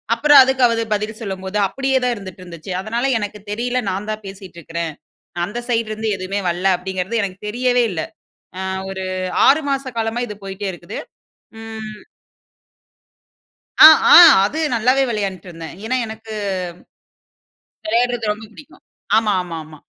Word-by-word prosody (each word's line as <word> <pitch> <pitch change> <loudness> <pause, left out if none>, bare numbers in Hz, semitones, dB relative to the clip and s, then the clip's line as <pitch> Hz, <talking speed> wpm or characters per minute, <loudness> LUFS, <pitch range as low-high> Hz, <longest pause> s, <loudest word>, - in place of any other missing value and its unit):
அப்புறம் 290 +3 +6
அதுக்கு 265 -1 0
அவர் 230 -1 0
பதில் 215 +2 -5
சொல்லும்போது 190 -1 -4
அப்படியே 270 +5 0
தான் 250 -1 +1
இருந்துட்டு 190 -3 -10
இருந்துச்சு. 170 +1 -9
அதனால 230 +5 -2
எனக்கு 205 0 -6
தெரியல 245 +3 -1
நான் 200 +3 -5
தான் 215 0 -6
பேசிட்டு 195 -2 -11
இருக்கிறேன். 165 0 -5 0.5
அந்த 220 +6 -5
சைட்லேருந்து 220 -2 -1
எதுமே 190 +2 -3
வரல 175 +2 -3
அப்படிங்கிறது 190 +4 -3
எனக்கு 190 0 -5
தெரியவே 245 +2 +1
இல்ல. 160 - -3 0.6
ஆ - - -4 0.3
ஒரு 190 0 -5 0.4
6 295 +3 +5
மாச 270 -1 -2
காலமா 225 +2 -1
இது 210 - -7
போயிட்டே 195 +1 -5
இருக்குது. 175 - -8 0.6
ம். 220 -1 -8 1.8
அ - - +11 0.3
ஆ. - - +11 0.3
அது 305 +10 -3 0.2
நல்லாவே 255 +4 +3
விளையாண்ட்டு 195 -4 -4
இருந்தேன். 165 -1 -9
ஏனா 255 +3 -1
எனக்கு 220 0 -10 1.5
விளையாட்றது 235 -1 0
ரொம்ப 215 +1 -7
பிடிக்கும். 295 +7 -16 0.4
ஆமா 215 -2 +2
ஆமா 170 -2 -7
ஆமா. 155 0 -14
215 Hz, 140 wpm, -19 LUFS, 190-235 Hz, 1.8 s, அ